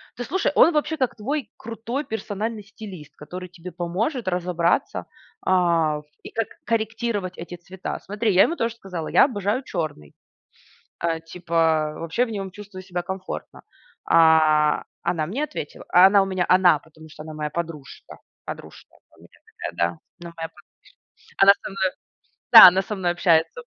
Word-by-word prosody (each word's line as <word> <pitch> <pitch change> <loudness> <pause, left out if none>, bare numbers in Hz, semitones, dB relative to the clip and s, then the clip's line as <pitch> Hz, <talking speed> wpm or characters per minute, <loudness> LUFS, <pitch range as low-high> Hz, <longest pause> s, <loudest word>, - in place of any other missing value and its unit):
то, 245 - -5
слушай, 320 +9 0
он 335 - +6
вообще 305 +1 0
как 260 -4 -1
твой 275 +6 -4
крутой 230 +5 -5
персональный 220 0 -4
стилист. 195 -7 -11
Который 180 +4 -9
тебе 180 0 -10
поможет 200 - -3
разобраться, 180 +4 0 0.4
а, 170 -5 +2 0.2
и - - -8
как 225 -1 -2 0.2
корректировать 220 -4 -2
эти 175 +1 -8
цвета. 180 +2 -7
Смотри, 210 +1 -1
я 190 - +7
ему 335 - 0
тоже 230 -4 -2
сказала: 185 -7 -6
"Я - - +6
обожаю 215 0 -2
черный". 155 - -5 0.9
Э, 165 -1 0
типа, 165 -3 +1
вообще 165 +10 -1
в - - -9
нём 195 -3 -5
чувствую 200 -1 -10
себя 180 -1 -4
комфортно. 190 +1 -7 0.4
А, 155 -2 +4 0.2
она 160 -3 0
мне 240 - -3
ответила- - - -6
а 180 +1 +7
она 200 0 +5
у - - +1
меня 185 -2 -1
"она", 180 -4 +5
потому 160 0 -17
что 150 - -11
она 155 0 -9
моя 150 0 -4
подружка. 160 -4 -7 0.3
Подружка - - -10
она - - -28
у - - -22
меня - - -20
такая, - - -7
да. 85 - +3 0.4
Она 170 - -9
моя 165 0 -5
подружка. 175 - -22 0.7
Она 200 0 +9
со - - -6
мной 190 -1 0 0.6
Да, - - +13
она 185 +2 +4
со 210 - -5
мной 180 -3 0
общается. 175 - +2
185 Hz, 165 wpm, -23 LUFS, 165-220 Hz, 0.9 s, Да